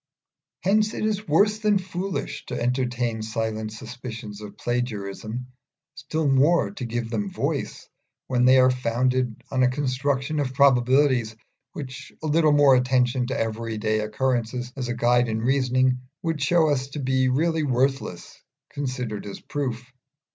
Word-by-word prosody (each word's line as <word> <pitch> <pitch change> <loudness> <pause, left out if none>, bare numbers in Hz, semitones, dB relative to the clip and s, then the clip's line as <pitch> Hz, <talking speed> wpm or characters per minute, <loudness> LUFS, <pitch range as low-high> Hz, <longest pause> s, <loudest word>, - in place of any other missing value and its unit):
Hence 210 +3 +2
it - - -2
is 215 -1 -1
worse 205 +8 +3
than 210 -2 +3
foolish 185 0 -4
to - - -4
entertain 120 -2 -1
silent 110 0 -3
suspicions 110 -2 -8
of 105 -1 -10
plagiarism, 120 -1 -3 0.5
still 155 +3 -2
more 140 +6 +3
to 140 -11 -6
give 120 0 -3
them 105 -3 -1
voice, - - -3 0.4
when 125 -1 +1
they 130 +1 +7
are 130 0 +6
founded 125 -1 0
on 130 -1 +1
a 125 - +5
construction 135 +2 -1
of 130 -2 -2
probabilities 130 -3 +3 0.4
which 135 -1 -8
a - - -2
little 155 +1 +3
more 145 -2 +6
attention 125 -1 +2
to 130 - -2
everyday 110 -1 -1
occurrences 125 +2 -1
as 130 -3 -3
a 120 - -2
guide 120 0 +3
in 110 0 -1
reasoning 130 0 +2 0.2
would 165 -3 -2
show 160 +2 +3
us 135 -2 0
to 140 +2 -7
be 130 -1 +1
really 160 +5 +1
worthless, 135 - -1 0.3
considered 125 -7 -4
as 100 - -7
proof. 125 -4 -4
130 Hz, 145 wpm, -24 LUFS, 120-140 Hz, 0.5 s, they